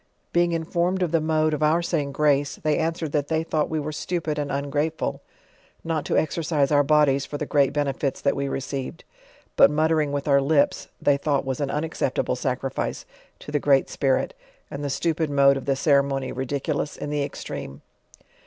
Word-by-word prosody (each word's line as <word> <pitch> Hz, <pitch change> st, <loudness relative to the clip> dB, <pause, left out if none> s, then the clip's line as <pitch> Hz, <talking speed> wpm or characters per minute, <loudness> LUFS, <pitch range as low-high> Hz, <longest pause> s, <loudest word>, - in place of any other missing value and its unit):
Being 175 Hz, 0 st, +3 dB
informed 170 Hz, +3 st, 0 dB
of 170 Hz, -, -1 dB
the 165 Hz, -1 st, +2 dB
mode 155 Hz, 0 st, +1 dB
of 150 Hz, -, -2 dB
our 160 Hz, +3 st, +3 dB
say 170 Hz, -2 st, 0 dB
ing 140 Hz, -1 st, -5 dB
grace, 145 Hz, 0 st, +1 dB
they 155 Hz, -1 st, 0 dB
an 165 Hz, 0 st, +1 dB
swered 160 Hz, -3 st, -5 dB
that 145 Hz, -2 st, 0 dB
they 160 Hz, 0 st, 0 dB
thought 155 Hz, -2 st, -1 dB
we 160 Hz, -, -1 dB
were 150 Hz, +1 st, -4 dB
stupid 155 Hz, -1 st, -3 dB
and 145 Hz, -1 st, -2 dB
ungrateful 145 Hz, +3 st, -2 dB, 0.6 s
not 160 Hz, -2 st, -2 dB
to -, -, 0 dB
exercise 155 Hz, -3 st, 0 dB
our 145 Hz, -1 st, +5 dB
bodies 145 Hz, -2 st, +3 dB
for 145 Hz, -, -5 dB
the 150 Hz, -, -3 dB
great 140 Hz, -2 st, +2 dB
benefits 140 Hz, -2 st, -1 dB
that 140 Hz, -, +1 dB
we 140 Hz, 0 st, -2 dB
received: 135 Hz, 0 st, -4 dB, 0.5 s
but -, -, +7 dB
muttering 155 Hz, 0 st, +1 dB
with 145 Hz, +1 st, -3 dB
our 140 Hz, -1 st, +4 dB
lips, 140 Hz, +1 st, +2 dB
they 140 Hz, -1 st, +2 dB
tnought 140 Hz, -2 st, 0 dB
was 130 Hz, -1 st, -3 dB
an 140 Hz, -2 st, -1 dB
unaccepta 150 Hz, -3 st, -1 dB
ble -, -, 0 dB
sacrifice 130 Hz, +1 st, -3 dB, 0.3 s
to -, -, -10 dB
the 145 Hz, -, +1 dB
Great 135 Hz, -1 st, +3 dB
Spirit, 135 Hz, -, 0 dB, 0.4 s
arid 140 Hz, -, -5 dB
the 145 Hz, -, -2 dB
stupid 160 Hz, +2 st, 0 dB
mode 140 Hz, -1 st, +5 dB
of 135 Hz, -, -5 dB
the 140 Hz, -, +2 dB
coreinony 140 Hz, -1 st, +1 dB
ridiculous 140 Hz, +3 st, -2 dB
in 145 Hz, -, -5 dB
the 150 Hz, -1 st, 0 dB
extreme. 70 Hz, -, -6 dB
145 Hz, 195 wpm, -24 LUFS, 140-155 Hz, 0.6 s, but